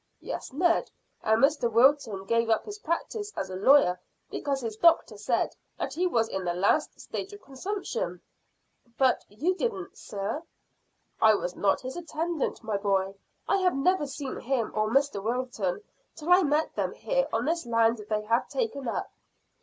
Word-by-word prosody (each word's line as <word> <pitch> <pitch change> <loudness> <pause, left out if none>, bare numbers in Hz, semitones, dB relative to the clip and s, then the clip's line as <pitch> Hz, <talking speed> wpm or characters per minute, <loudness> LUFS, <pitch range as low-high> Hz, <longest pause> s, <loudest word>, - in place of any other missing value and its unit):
"Yes, - - -6
Ned, 340 +5 +2 0.3
and 220 +3 +2
Mr 275 -5 +3
Wilton 230 -5 +3
gave 230 +2 +1
up 220 - +2
his 415 0 -7
practice 415 +5 -3
as 190 - -3
a - - -4
lawyer 185 -4 +5 0.3
because 275 -2 -2
his 225 -3 -4
doctor 335 +8 +4
said - - 0 0.2
that - - -3
he 365 +2 +1
was 230 -9 +2
in 190 -3 -3
the 175 -1 -1
last 200 - +1
stage 390 - -6
of 410 - -12
consumption." 405 - -4 0.8
"But 260 -2 +3
you 300 - 0
didn't, 385 -2 -3
sir." 205 +8 -4 0.8
"I 220 -1 +7
was 180 -3 -3
not 195 -1 +2
his 255 +1 -6
attendant, 330 -4 -2
my 220 -2 -1
boy. 195 -1 0 0.3
I 395 - +3
had 370 -4 +2
never 300 +1 +2
seen 275 -1 -5
him 240 -3 -1
or 215 0 +1
Mr 275 -4 +2
Wilton 240 - -2 0.3
till 320 +3 -3
I 360 +1 +8
met 300 -1 +1
them - - -1
here - - 0
on - - 0
this 335 -3 -1
land 230 0 +3
they 210 -1 0
have 230 +2 +1
taken 425 - -2
up." 230 - -3
265 Hz, 170 wpm, -28 LUFS, 220-335 Hz, 0.8 s, I